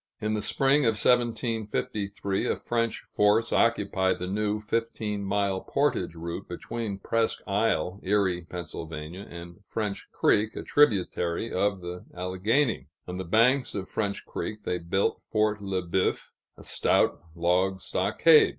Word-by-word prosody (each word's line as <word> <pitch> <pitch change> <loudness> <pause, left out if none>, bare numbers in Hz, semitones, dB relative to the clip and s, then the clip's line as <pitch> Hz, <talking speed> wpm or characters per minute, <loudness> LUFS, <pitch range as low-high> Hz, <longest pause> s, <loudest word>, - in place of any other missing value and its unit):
In 110 0 -1
the 105 - 0
spring 135 +6 +3
of 115 - +4
1753, 110 -4 0
a - - +1
French 115 -1 -1
force 105 +3 +2
occupied 100 -5 +2
the 90 - -4
new 105 +2 -1
fifteen 105 -1 -2
mile 100 -1 0
portage 130 - 0
route 85 +3 -5
between 105 +3 -4
Presque 115 +3 0
Isle 100 -3 0
(Erie, 95 -3 +1
Pa.) 90 -1 -4 0.7
and 85 +3 -10
French 105 0 -4
Creek, 105 +1 +2
a - - -5
tributary 100 -7 +2
of 100 0 +1
the 90 0 -7
Alleghany. 95 - 0 0.2
On 90 0 -5
the 95 - -3
banks 115 +8 +3
of 95 -2 -3
French 100 -2 -2
Creek 105 -1 -5
they 90 -3 -1
built 85 +4 0
Fort 105 -1 0
Le 95 -2 -2
Boeuf, 90 +2 0 0.3
a - - -12
stout - - +2
log 90 +3 +2
stockade. 155 - +4
100 Hz, 140 wpm, -27 LUFS, 90-115 Hz, 0.7 s, of